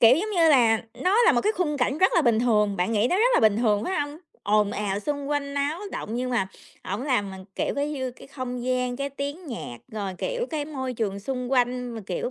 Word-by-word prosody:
kiểu, 240 +3 +8
giống 425 +5 -2
như 340 -5 +4
là 230 -6 +5
nó 400 +6 +3
là 470 - +6
một - - +2
cái 425 - +1
khung 310 -5 0
cảnh 270 +2 0
rất 375 +2 +4
là 340 - +4
bình 235 -5 +3
thường, 210 -4 +2
bạn 180 +5 0
nghĩ 215 +1 +3
nó 360 - +3
rất 470 +5 +4
là - - +5
bình 215 -2 +4
thường, 215 -3 +2
phải 370 -2 0
hông? 290 +1 -4 0.2
Ồn 210 0 +3
ào, 200 -1 -2
xung 285 +4 -3
quanh 285 -1 -2
náo 285 +4 -1
động 220 - -4
nhưng 250 +1 -2
mà 215 -6 +1 0.4
ổng 200 +5 -3
làm 245 -8 0
mình, 190 0 -9
kiểu, - - -1
cái 285 +1 -1
như 260 -3 -3
cái 245 - -14
không 250 -3 -5
gian, 250 -1 0
cái 280 +1 -3
tiếng 285 +5 -5
nhạc, 225 - -6
rồi, 200 -3 -3
kiểu, - - -2
cái 305 -3 -2
môi 260 -4 -4
trường 200 -4 -2
xung 250 +3 -4
quanh 250 -1 +1
mà, 225 - -5
kiểu, - - -2
255 Hz, 255 wpm, -25 LUFS, 220-295 Hz, 0.4 s, kiểu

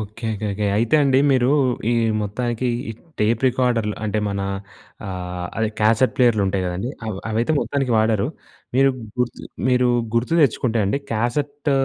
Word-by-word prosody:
Okay. 110 +2 -6
Okay. 105 +1 -4
Okay. 105 +1 -1
అయితే 115 +5 +1
అండి 135 -2 +4
మీరు 130 -2 +3 0.4
ఈ - - +3 0.3
మొత్తానికి 120 +4 -2 0.2
ఈ - - -4 0.3
టేప్ 110 +2 +2
రికార్డర్లు 120 -4 0
అంటే 110 0 -1
మన 100 0 -2 0.7
ఆహ్, 90 -1 -5
అదే 110 -1 +1
క్యాసెట్ 110 +2 +3
ప్లేయర్లుంటాయి 105 -6 +2
కదండీ! 90 +7 -3 0.2
అవ్ 110 -3 -3
అవైతే 115 +7 +1
మొత్తానికి 135 -4 -1
వాడరు. 110 -1 +2 0.5
మీరు 135 +1 +5 0.3
గుర్తు 125 -1 -1 0.3
మీరు 125 -1 +3 0.3
గుర్తు 120 +8 +1
తెచ్చుకుంటే 120 -3 +1
అండి 100 +8 0
క్యాసెట్ 140 +6 -1
115 Hz, 145 wpm, -21 LUFS, 105-125 Hz, 0.7 s, మీరు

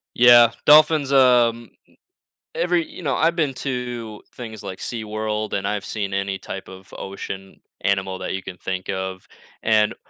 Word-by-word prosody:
Yeah, 120 -1 +7
dolphins, 150 -1 +6
um 120 -4 +4 0.8
Every 175 -2 +1
You - - -11
know, 140 -6 -1
I've 165 +2 +2
been 150 -6 0
to 120 -5 -5
things 110 -4 -8
like 95 -2 -7
SeaWorld, 110 -1 -4
and 100 0 -1
I've 105 -1 -2
seen 100 -3 -4
any 100 0 -1
type 95 0 -8
of 95 0 -13
ocean 95 0 -7 0.2
animal 95 -1 -1
that - - -4
you 95 - -5
can 90 - -8
think 95 +1 -5
of, 95 -1 -5 0.4
and 110 -1 +3
110 Hz, 155 wpm, -22 LUFS, 95-125 Hz, 0.8 s, Yeah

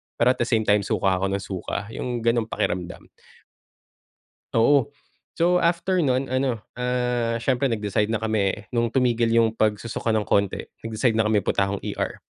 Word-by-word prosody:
pero 120 +2 +4
at 130 - -4
the 120 - 0
same 110 -3 +2
time 105 0 +3
suka 95 -1 0
ako 95 - 0
ng 100 - -4
suka 100 +3 -5
yung 120 -1 -4
ganong 115 -1 +1
pakiramdam. 90 -4 -3 1.4
Oo, 130 +3 +3 0.4
so 175 +1 +3
after 175 +2 +1
non 130 0 0
ano, 130 -3 0 0.2
ah, 125 -2 -1
siyempre 130 +1 +1
nag-decide 105 0 0
na 110 -1 -1
kami, 105 -2 -1
nung 120 -2 0
tumigil 120 -3 +2
yung 115 -1 +4
pag-susuka 110 +1 -1
ng 110 -1 0
konti 100 -1 +1 0.2
nag-decide 115 +1 0
na 110 - +2
kami 105 -2 +2
punta 95 +1 +1
akong 100 0 -3
ER. - - -4
115 Hz, 165 wpm, -24 LUFS, 105-125 Hz, 1.4 s, pero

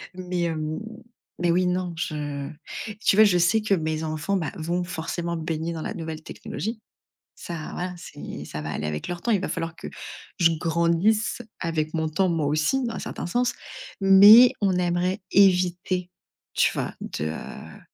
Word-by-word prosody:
Mais, 180 -1 -3
hem 155 -2 -2 0.6
mais 175 - +3
oui, 180 +1 +2
non, 180 -1 -1
je 145 -4 -4 0.6
tu - - +5
vois, 215 - +8
je 180 -4 +4
sais 175 +6 +3
que 210 -2 +1
mes 155 -2 -1
enfants, 155 +5 -2
bah, 160 -5 -2
vont 170 +3 -1
forcément 170 0 -3
baigner 160 +1 -3
dans 160 - -5
la 210 - -4
nouvelle 160 -4 -6
technologie. 220 +2 -6 0.5
Ça, 165 -3 -7
voilà, 180 0 -4
c'est - - -8
ça 75 - -6
va 75 +1 -4
aller 75 - -3
avec 75 0 -4
leur 175 -1 -5
temps. 240 - -1
Il 200 - +2
va - - -3
falloir 165 -1 -3
que - - -7 0.5
je 170 -2 +5
grandisse 170 +8 +1 0.2
avec 160 -2 -2
mon 160 -1 0
temps, 185 +4 +1
moi 165 -3 0
aussi, 155 - +1
dans 230 - -3
un - - -4
certain - - -5
sens. 245 +7 0 0.5
Mais 205 +6 +9
on 195 -2 +2
aimerait 180 +2 0
éviter, 180 -1 +3 0.4
tu - - +3
vois, - - -3
de, 75 - -4
heu 80 +1 -7
175 Hz, 175 wpm, -25 LUFS, 160-190 Hz, 0.6 s, Mais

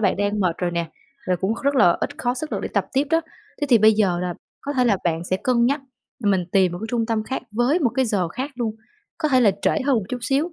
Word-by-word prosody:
bạn 195 -4 +2
đang 205 +1 0
mệt 180 -3 +1
rồi 180 -1 -1
nè, 170 -1 -3 0.4
rồi 180 - +1
cũng 190 +5 -1
rất 280 +1 +2
là 180 -9 +5
ít 285 +3 -3
khó 245 -4 0
sức 305 +4 -5
lực - - -1
để - - -4
tập - - +1
tiếp 270 +1 +2
đó. 325 - +4 0.4
Thế 290 - 0
thì 235 - +7
bây 215 +1 +6
giờ 195 -5 +1
là 180 -1 -2 0.3
có 285 - -4
thể 255 -3 +2
là 220 -5 +3
bạn 165 0 0
sẽ 185 - 0
cân 235 +3 +2
nhắc, 280 +3 +1 0.4
mình 190 -3 +2
tìm 190 -3 +3
một 175 - -5
cái 220 - -5
trung 230 -2 0
tâm 225 -2 0
khác 265 - -4
với 240 +9 +2
một 265 -9 +2
cái 265 - +2
giờ 200 -7 0
khác 260 - -4
luôn, 230 -3 -3 0.4
có 310 - 0
thể 260 -3 +4
là 220 -4 +5
trễ - - +2
hơn 275 -3 +3
một 220 - -1
chút 250 - -3
xíu. 285 +7 0
225 Hz, 285 wpm, -22 LUFS, 190-265 Hz, 0.4 s, thì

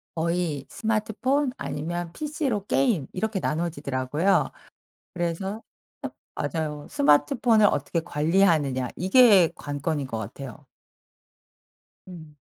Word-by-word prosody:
거의 165 -4 -1
스마트폰 225 +6 0
아니면 170 +3 -4
PC로 285 -9 -2
게임 215 - +1
이렇게 215 +1 -2
나눠지더라고요. 150 0 0 0.6
그래서 185 +5 -3 0.7
어 - - -2
맞아요. 150 -3 -4
스마트폰을 215 - +4
어떻게 155 0 0
관리하느냐 155 -5 +1
이게 195 -2 +6
관건인 145 0 -3
것 115 - -5
같아요. 115 +3 -8 1.4
음. 160 -5 -11
170 Hz, 260 characters per minute, -25 LUFS, 145-210 Hz, 1.4 s, 이게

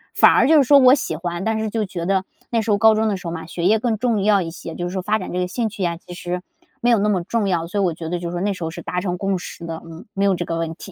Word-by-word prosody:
反 - - +7
而 - - +4
就 315 +1 +6
是 290 - +6
说 280 +2 +6
我 255 0 +7
喜 210 - -3
欢， 175 +2 -4
但 220 +1 0
是 220 0 -2
就 220 0 -1
觉 175 -3 -5
得 190 0 +1 0.3
那 230 -1 +1
时 220 - -1
候 205 - +4
高 220 +1 +6
中 220 +1 +1
的 210 - 0
时 185 - -13
候 - - -3
嘛， 165 - -6
学 170 +1 -4
业 215 +4 +4
更 225 -1 0
重 225 -3 0
要 205 -1 +4
一 165 -2 -4
些， 165 -1 -8
就 175 - -3
是 - - -8
说 190 - -2
发 210 +4 +1
展 - - -6
这 180 - -2
个 180 - 0
兴 225 +4 -2
趣 210 -1 -9
呀， 170 -1 0
其 175 +1 -12
实 175 0 -4 0.4
没 240 - +2
有 235 - +5
那 205 - +1
么 190 -4 +1
重 215 +3 -1
要， 170 -3 0
所 200 +4 -2
以 - - +2
我 175 -3 +1
觉 160 0 -6
得 175 +1 -2
就 170 0 -4
是 - - -6
说 175 - -3
那 200 +1 0
时 185 - -7
候 160 - -2
是 170 +1 -8
达 180 - -3
成 180 -1 -2
共 195 0 -1
识 170 - -8
的， 165 -1 -5
嗯， 165 0 -11
没 195 0 0
有 195 -1 +3
这 175 - -3
个 165 - -3
问 165 -1 -2
题。 195 - -11
190 Hz, 390 characters per minute, -21 LUFS, 175-215 Hz, 0.4 s, 反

